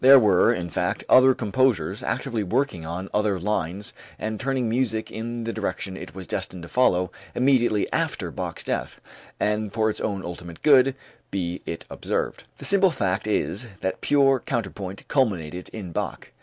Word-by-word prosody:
There 135 +1 +10
were, 105 -7 +5
in 85 -1 -3
fact, - - -1
other 130 0 +7
composers 115 -6 +1
actively 115 -2 -2
working 100 - -1
on 90 +3 -4
other 105 -2 +1
lines 95 0 -2 0.2
and 110 0 -3
turning 135 -2 0
music 115 -1 0
in 115 +1 -4
the 115 0 -3
direction 95 -2 -3
it 95 - -9
was 95 -1 -6
destined 90 0 -4
to 85 - -9
follow 90 -8 +3 0.2
immediately 125 -5 +3
after - - -1
Bach's - - -4
death - - -3 0.4
and 105 0 0
for 110 0 +2
its - - -7
own 100 -3 -2
ultimate 85 -1 -8
good, 135 -3 +6 0.3
be 90 -2 -3
it 85 - -5
observed. - - -3
The - - -8
simple 195 -1 +4
fact 105 - -1
is, 105 +2 0
that 95 - -2
pure 135 -2 +4
counterpoint 100 -6 -4
culminated 90 - 0
in 100 -6 -7
Bach. - - -4
105 Hz, 165 wpm, -25 LUFS, 90-125 Hz, 0.4 s, There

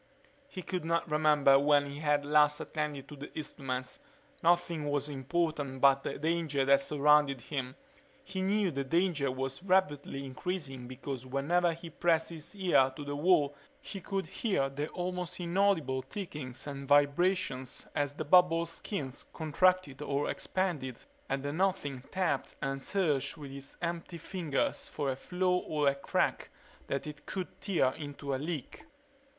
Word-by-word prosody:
He 190 -10 -7
could 180 -3 -3
not 165 0 0
remember 150 -3 +5
when 145 0 +3
he 140 - -7
had 145 -1 +2
last 150 0 +4
attended 150 -3 -3
to 150 - -9
the 145 +1 -9
instruments. 135 - -4 0.4
Nothing 170 -3 +2
was 145 0 0
important 145 -1 -1
but 135 0 +6
the - - -4
danger 155 -3 0
that 140 0 +6
surrounded 145 -1 +4
him. 130 -1 -4 0.5
He 190 0 -4
knew 200 0 +2
the 140 -2 -2
danger 160 -2 +1
was 135 +3 -3
rapidly 180 -7 +1
increasing 135 -3 -4
because 130 0 -6
whenever 165 +6 +2
he 165 0 -9
pressed 165 -2 +2
his 165 +4 -8
ear 175 -9 +4
to 145 - -6
the 145 0 -3
wall 150 -2 +3 0.2
he 195 - -8
could 195 +1 -2
hear 190 - 0
the 145 +2 -3
almost 180 0 -4
inaudible 170 -7 +2
tickings 140 - -6
and 140 -1 -6
vibrations 145 -2 +2
as 145 -1 0
the 155 +1 -4
bubble's 170 0 +5
skin 145 - -4 0.2
contracted 160 -2 +2
or 145 0 0
expanded 150 -10 -2 0.3
and 135 0 -1
the 145 0 -2
Nothing 170 -7 0
tapped 185 -2 -1
and 135 -1 -2
searched 160 -6 0
with 145 -3 -8
its 140 0 -10
empty 170 0 -3
fingers 165 -3 -2
for 140 -2 -1
a - - -2
flaw 180 +5 +1
or 150 -4 +1
crack 140 - 0 0.4
that 140 - -2
it 150 0 -9
could 185 -2 -5
tear 175 -10 +2
into 145 -1 -5
a - - +1
leak. 155 - -5
150 Hz, 155 wpm, -31 LUFS, 140-175 Hz, 0.5 s, but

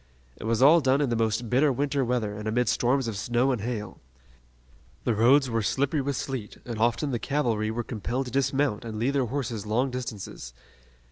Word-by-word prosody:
It - - -8
was 115 +2 +2
all 160 +4 +7
done 135 0 +3
in 140 -4 0
the - - +1
most 115 +1 0
bitter 135 +6 +3
winter 140 +1 0
weather 115 -4 -1
and 105 +1 -6
amid 120 +3 +1
storms 130 +1 +1
of 110 - -3
snow 120 +6 +1
and 125 -5 -2
hail. 105 -4 -4 1.0
The 120 - +1
roads 130 +6 +4
were 115 -2 0
slippery 140 +7 0
with 140 0 -2
sleet, 125 -7 -5
and 115 -3 -5
often 120 +5 +1
the 120 - -1
cavalry 115 -7 0
were 120 +2 -2
compelled 120 +4 -3
to 125 - -7
dismount 135 -4 0
and 110 -2 -6
lead 120 +5 +1
their 140 -2 +1
horses 120 -5 -3
long 125 +5 +1
distances. 105 - -6
120 Hz, 200 wpm, -27 LUFS, 110-135 Hz, 1.0 s, all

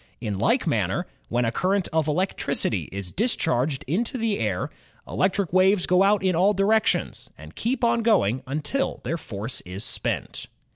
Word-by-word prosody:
In 105 -5 -3
like - - +2
manner, - - 0 0.2
when 120 0 +1
a 115 - 0
current 190 +8 0
of 160 -1 +1
electricity 180 +6 0
is 95 -2 -6
discharged 160 - 0
into 225 - -1
the 225 -3 0
air, 100 -5 -1 0.4
electric 190 -2 0
waves 185 0 +4
go 180 +1 +3
out 200 0 +3
in 185 -2 +2
all 195 +5 +3
directions 215 +3 +1
and - - -12
keep 250 +2 -2
on 235 0 +3
going 160 - +2
until 155 - -2
their 165 - -2
force 110 -1 -3
is 95 +3 -6
spent. - - -2
180 Hz, 160 wpm, -24 LUFS, 125-210 Hz, 0.4 s, waves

